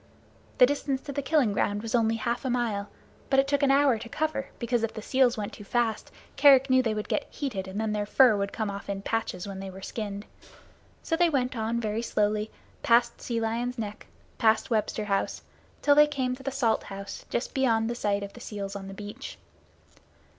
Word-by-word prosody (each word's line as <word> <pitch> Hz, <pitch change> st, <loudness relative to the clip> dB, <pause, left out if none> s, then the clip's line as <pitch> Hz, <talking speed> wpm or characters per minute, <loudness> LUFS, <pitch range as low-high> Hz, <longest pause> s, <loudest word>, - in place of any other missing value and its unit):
The 250 Hz, -, +8 dB
distance 275 Hz, 0 st, -1 dB
to 290 Hz, -, -6 dB
the 285 Hz, -, -2 dB
killing 275 Hz, -7 st, +2 dB
grounds 205 Hz, +1 st, 0 dB
was 225 Hz, -, -4 dB
only 225 Hz, -2 st, +3 dB
half 235 Hz, +3 st, -2 dB
a 260 Hz, -, -1 dB
mile, 225 Hz, -5 st, -1 dB, 0.4 s
but 270 Hz, -, +4 dB
it 270 Hz, -, +3 dB
took 285 Hz, 0 st, +1 dB
an 280 Hz, -, +3 dB
hour 275 Hz, -4 st, +4 dB
to 230 Hz, -, -8 dB
cover, 310 Hz, 0 st, -2 dB
because 240 Hz, -1 st, 0 dB
if 225 Hz, -1 st, -2 dB
the 220 Hz, -, -5 dB
seals 255 Hz, -1 st, +3 dB
went 205 Hz, -1 st, -4 dB
too 210 Hz, -, -10 dB
fast 225 Hz, +1 st, -1 dB, 0.3 s
Kerick 270 Hz, -2 st, +6 dB
knew 260 Hz, 0 st, +6 dB
that 240 Hz, -, 0 dB
they 215 Hz, -, -1 dB
would 210 Hz, -, -3 dB
get 295 Hz, -, -1 dB
heated 215 Hz, -10 st, -4 dB
and 190 Hz, +2 st, -5 dB
then 220 Hz, -1 st, -1 dB
their 210 Hz, -1 st, -1 dB
fur 250 Hz, -1 st, +6 dB
would 200 Hz, 0 st, -2 dB
come 215 Hz, -2 st, -2 dB
off 200 Hz, 0 st, -8 dB
in 195 Hz, 0 st, -3 dB
patches 210 Hz, -4 st, -2 dB
when 195 Hz, -1 st, -6 dB
they 195 Hz, 0 st, -6 dB
were 190 Hz, +1 st, -10 dB
skinned. 205 Hz, -1 st, -5 dB, 0.8 s
So 325 Hz, -, 0 dB
they 345 Hz, 0 st, +4 dB
went 255 Hz, -4 st, 0 dB
on 225 Hz, +1 st, -1 dB
very 220 Hz, 0 st, -2 dB
slowly, 210 Hz, -1 st, 0 dB, 0.3 s
past 235 Hz, 0 st, +3 dB
Sea 235 Hz, -2 st, -2 dB
Lion's 235 Hz, +3 st, -2 dB
Neck, 215 Hz, -2 st, -6 dB, 0.3 s
past 220 Hz, +1 st, +3 dB
Webster 215 Hz, -1 st, 0 dB
House, 195 Hz, -1 st, -1 dB, 0.4 s
till 290 Hz, -, +6 dB
they 295 Hz, +1 st, +7 dB
came 260 Hz, -4 st, -1 dB
to 265 Hz, -, -13 dB
the 270 Hz, -, -2 dB
Salt 255 Hz, -4 st, 0 dB
House 195 Hz, 0 st, -8 dB
just 240 Hz, -, -2 dB
beyond 230 Hz, -4 st, +2 dB
the 235 Hz, -, -1 dB
sight 205 Hz, -4 st, -1 dB
of 200 Hz, -, -7 dB
the -, -, -12 dB
seals 200 Hz, -4 st, -6 dB
on 195 Hz, -1 st, -6 dB
the 195 Hz, -, -8 dB
beach. 210 Hz, +7 st, -8 dB
230 Hz, 220 wpm, -27 LUFS, 210-260 Hz, 0.8 s, The